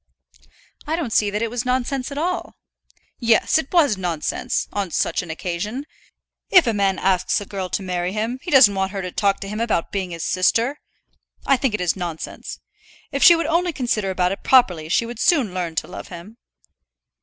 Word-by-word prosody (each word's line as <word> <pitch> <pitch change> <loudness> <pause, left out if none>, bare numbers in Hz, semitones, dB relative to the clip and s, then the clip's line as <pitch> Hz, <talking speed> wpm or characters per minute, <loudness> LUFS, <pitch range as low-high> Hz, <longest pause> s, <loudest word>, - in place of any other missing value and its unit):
"I 315 - 0
don't 295 -10 -3
see 210 - +3
that 210 +2 -2
it 230 - -2
was 245 0 -2
nonsense 255 +1 -1
at 280 - -6
all." 355 +4 -2 0.6
"Yes, 230 +5 +3
it 300 - -6
was 290 - +3
nonsense, 175 -4 -2
on 200 -3 -2
such - - 0
an 180 - -10
occasion. 185 - -4 0.6
If 365 -5 +6
a 230 - +1
man 195 -2 +1
asks 185 -2 +1
a 205 - -7
girl 190 -2 -5
to 195 - -2
marry 180 -1 -2
him, 225 +5 -3
he 350 - -7
doesn't 260 -9 +7
want 190 0 -2
her 195 -1 -4
to 180 - -5
talk 200 +1 +1
to 195 - -5
him 210 +2 -5
about 225 -7 -1
being 190 -2 -2
his 165 -1 -6
sister. 230 +9 +1 0.7
I 275 - +4
think 255 -4 0
it 210 - -4
is 175 -2 +1
nonsense. 175 -4 -6 0.5
If 275 -1 -3
she 345 -2 +9
would 335 - -1
only 340 +3 +1
consider 230 -7 -1
about 180 -1 0
it 195 - -5
properly 180 -12 +3
she 230 - +2
would 235 -1 -8
soon 280 - +2
learn 175 -3 -3
to - - -2
love - - -9
him." 180 +6 -11
210 Hz, 200 wpm, -21 LUFS, 185-260 Hz, 0.7 s, she